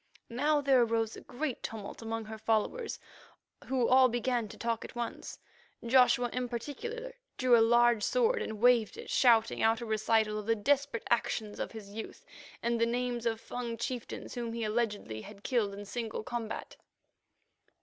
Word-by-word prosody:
Now 290 +5 +2
there 270 -3 +4
arose 225 -1 +1
a - - -10
great 265 0 -4
tumult 220 -1 -6
among 225 0 -4
her 220 0 -8
followers, 225 - 0 0.7
who 255 -3 +1
all 260 0 +6
began 240 -1 0
to - - -11
talk 230 -1 -2
at - - -10
once. 240 -1 -5 0.5
Joshua 245 -1 +4
in 250 -1 -2
particular 465 - -5 0.2
drew 255 -2 +5
a 230 - +6
large 235 0 +5
sword 480 - +2
and 215 -1 -4
waved 245 - +4
it, 465 - -8
shouting 230 -3 +4
out 225 0 +3
a 235 - -5
recital 220 -1 +1
of 210 - -8
the 230 - +3
desperate 280 +2 0
actions 220 -2 0
of - - -3
his 210 -3 -9
youth 220 +2 -8 0.4
and 235 0 0
the 230 - +4
names 240 0 -1
of 225 -1 -1
Fung 235 -1 -5
chieftains 245 -1 -5
whom 235 -2 -4
he 230 0 -3
alleged 215 -1 -1
he 110 -1 -6
had 205 - -12
killed 230 -6 +1
in 205 +1 -8
single 225 +1 -4
combat. 235 -1 -5
235 Hz, 175 wpm, -31 LUFS, 220-250 Hz, 0.7 s, all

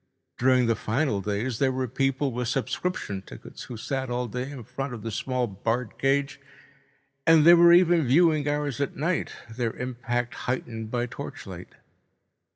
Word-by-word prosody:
During 130 0 +4
the 115 -1 +2
final 115 -2 0
days 105 +4 -2
there 135 -2 +3
were 130 0 -2
people 135 +2 0
with 125 0 -3
subscription 135 - -2
tickets - - -11
who 120 - -8
sat 130 +3 -3
all 125 0 -1
day 125 +4 -4
in 135 -4 -8
front 135 +3 -5
of 110 - -10
the 115 - -4
small 125 +3 -1
barred 115 +3 -3
cage. 135 +1 +1 0.9
And 160 -2 +6
there 170 +1 +10
were 170 0 +7
even 175 -4 +5
viewing 155 +1 +4
hours 145 -2 -1
at 140 - -2
night, 170 +5 -1 0.2
their 120 -2 -1
impact 120 -1 -3 0.2
heightened 115 -3 -3
by 120 +1 -1
torchlight. 125 - -8
130 Hz, 160 wpm, -26 LUFS, 120-140 Hz, 0.9 s, there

